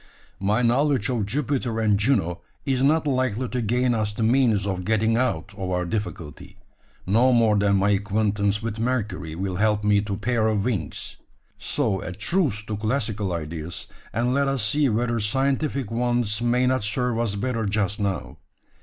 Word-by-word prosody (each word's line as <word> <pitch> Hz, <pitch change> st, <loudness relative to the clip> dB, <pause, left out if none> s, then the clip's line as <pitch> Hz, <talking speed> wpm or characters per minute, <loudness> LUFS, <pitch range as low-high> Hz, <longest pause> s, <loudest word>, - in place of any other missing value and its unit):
My 105 Hz, +5 st, +1 dB
knowledge 130 Hz, -1 st, +2 dB
of 115 Hz, -6 st, -1 dB
Jupiter 130 Hz, -2 st, -1 dB
and 110 Hz, -2 st, +3 dB
Juno 100 Hz, -6 st, +1 dB, 0.2 s
is 135 Hz, -3 st, +1 dB
not 155 Hz, +3 st, +3 dB
likely 130 Hz, -3 st, 0 dB
to 125 Hz, -, -2 dB
gain 120 Hz, +3 st, +1 dB
us 105 Hz, -2 st, -1 dB
the 115 Hz, -, -1 dB
means 115 Hz, -4 st, +3 dB
of 95 Hz, -2 st, -2 dB
getting 110 Hz, +3 st, +2 dB
out 110 Hz, -6 st, -1 dB
of 95 Hz, -2 st, -4 dB
our 90 Hz, -1 st, 0 dB
difficulty, 85 Hz, -6 st, -5 dB, 0.5 s
no 115 Hz, +7 st, +4 dB
more 115 Hz, -3 st, +4 dB
than 100 Hz, -1 st, +3 dB
my 100 Hz, +1 st, +3 dB
acquaintance 100 Hz, 0 st, 0 dB
with 115 Hz, -1 st, -4 dB
Mercury 105 Hz, -9 st, -2 dB
will 95 Hz, +1 st, -3 dB
help 105 Hz, 0 st, +2 dB
me 105 Hz, -1 st, +3 dB
to 105 Hz, -1 st, -4 dB
a -, -, -3 dB
pair 115 Hz, -1 st, +1 dB
of 105 Hz, -2 st, 0 dB
wings. 95 Hz, -, -3 dB, 0.4 s
So 95 Hz, 0 st, -1 dB
a 95 Hz, -, -5 dB
truce 115 Hz, -, 0 dB
to 105 Hz, 0 st, -4 dB
classical 110 Hz, -3 st, -1 dB
ideas, 80 Hz, 0 st, -5 dB, 0.3 s
and 120 Hz, +3 st, 0 dB
let 140 Hz, +1 st, +2 dB
us 135 Hz, -5 st, 0 dB
see 145 Hz, +5 st, +2 dB
whether 120 Hz, +1 st, 0 dB
scientific 135 Hz, +2 st, 0 dB
ones 120 Hz, -2 st, 0 dB
may 120 Hz, +1 st, +2 dB
not 130 Hz, -3 st, +1 dB
serve 120 Hz, +2 st, 0 dB
us 115 Hz, -4 st, 0 dB
better 115 Hz, 0 st, -1 dB
just 105 Hz, +1 st, 0 dB
now. 100 Hz, -3 st, -3 dB
110 Hz, 175 wpm, -24 LUFS, 100-125 Hz, 0.5 s, no